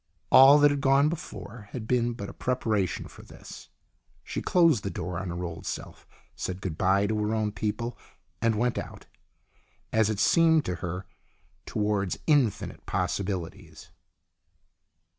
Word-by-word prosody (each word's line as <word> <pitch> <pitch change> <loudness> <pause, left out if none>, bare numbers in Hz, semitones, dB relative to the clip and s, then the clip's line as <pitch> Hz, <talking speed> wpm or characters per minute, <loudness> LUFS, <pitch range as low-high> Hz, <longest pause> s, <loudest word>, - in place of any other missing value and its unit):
All 135 +2 +9
that 145 0 +5
had 145 -1 -2
gone 140 +2 +4
before 115 -9 -8
had 115 -4 -5
been 120 -1 +1
but 100 -3 -7
a - - -9
preparation 110 -8 -1
for - - -14
this. - - -12 0.5
She - - -4
closed 165 - +3
the 100 - -2
door 90 -2 -4
on 95 -1 -5
her 85 +1 -4
old 85 -1 -6
self, - - -7 0.3
said 90 0 -4
good 95 -5 -4
bye 95 +4 +2
to 105 +1 -1
her 105 +1 0
own 110 -1 0
people 115 +3 -3 0.5
and 115 -1 +2
went 120 +3 0
out, - - -9 0.9
as 110 -1 +3
it 105 -2 -2
seemed 160 +1 +4
to 90 - -3
her, 90 +2 -5 0.6
towards 105 -3 -1
infinite 145 -9 +1
possibilities. 95 -4 -4
110 Hz, 150 wpm, -27 LUFS, 95-125 Hz, 0.9 s, All